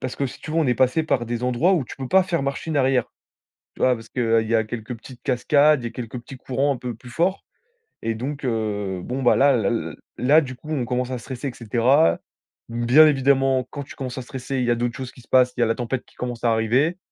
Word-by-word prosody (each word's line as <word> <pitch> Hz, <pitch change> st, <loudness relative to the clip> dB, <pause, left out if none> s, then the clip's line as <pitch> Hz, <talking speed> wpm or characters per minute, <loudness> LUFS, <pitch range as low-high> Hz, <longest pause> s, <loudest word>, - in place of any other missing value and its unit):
parce 130 Hz, -, -4 dB
que 140 Hz, -, 0 dB
si 130 Hz, -, -10 dB
tu -, -, -8 dB
veux, 165 Hz, -, +1 dB
on 160 Hz, -, +2 dB
est 125 Hz, -, +2 dB
passé 130 Hz, +7 st, +2 dB
par 130 Hz, -6 st, 0 dB
des 120 Hz, +1 st, -3 dB
endroits 125 Hz, +10 st, +2 dB
où 150 Hz, -7 st, 0 dB
tu -, -, -10 dB
peux 130 Hz, -2 st, -6 dB
pas 190 Hz, 0 st, +5 dB
faire 175 Hz, -5 st, -1 dB
machine 140 Hz, +3 st, -3 dB
arrière. 130 Hz, -3 st, +3 dB, 0.7 s
Tu -, -, -10 dB
vois? 125 Hz, -1 st, +4 dB
Parce 115 Hz, 0 st, -12 dB
qu'il 115 Hz, -2 st, +1 dB
y 115 Hz, -, +2 dB
a 110 Hz, -, +3 dB
quelques 115 Hz, +2 st, -6 dB
petites 125 Hz, +2 st, -13 dB
cascades, 145 Hz, +2 st, +3 dB
il -, -, -5 dB
y -, -, 0 dB
a -, -, -14 dB
quelques 120 Hz, 0 st, -6 dB
petits 130 Hz, +2 st, -11 dB
courants 135 Hz, +3 st, 0 dB
un -, -, -6 dB
peu 120 Hz, -2 st, -5 dB
plus 125 Hz, +2 st, -14 dB
forts. 175 Hz, +9 st, 0 dB, 0.6 s
Et 115 Hz, 0 st, -1 dB
donc, 140 Hz, +6 st, -5 dB
heu, 105 Hz, -5 st, -2 dB
bon 130 Hz, +2 st, -4 dB
bah 120 Hz, -, +5 dB
là 140 Hz, 0 st, +5 dB
là 110 Hz, -5 st, 0 dB
l 80 Hz, -10 st, -3 dB, 0.2 s
là, 140 Hz, +7 st, +5 dB
du 130 Hz, -4 st, -6 dB
coup, 150 Hz, +5 st, -13 dB
on 130 Hz, -6 st, -1 dB
commence 125 Hz, +2 st, -2 dB
à 125 Hz, -, -2 dB
stresser, 130 Hz, +3 st, -5 dB
et -, -, -9 dB
cetera. 115 Hz, -, +3 dB, 0.5 s
Bien 120 Hz, +7 st, +5 dB
évidemment, 135 Hz, -2 st, +2 dB
quand 145 Hz, -1 st, -5 dB
tu -, -, -12 dB
commences 130 Hz, -1 st, -6 dB
à 130 Hz, -, -6 dB
stresser, 130 Hz, +1 st, -5 dB
il 125 Hz, -, 0 dB
y 120 Hz, -, +2 dB
a -, -, +3 dB
d'autres 120 Hz, 0 st, -2 dB
choses 130 Hz, -2 st, -6 dB
qui 125 Hz, -, -16 dB
se -, -, -23 dB
passent, 125 Hz, -1 st, +4 dB
il -, -, 0 dB
y -, -, +6 dB
a -, -, +2 dB
la 115 Hz, -, +1 dB
tempête 125 Hz, +1 st, -3 dB
qui -, -, -25 dB
commence 120 Hz, -2 st, -5 dB
à 120 Hz, -, +3 dB
arriver. 125 Hz, -, +1 dB
125 Hz, 275 wpm, -23 LUFS, 120-140 Hz, 0.7 s, y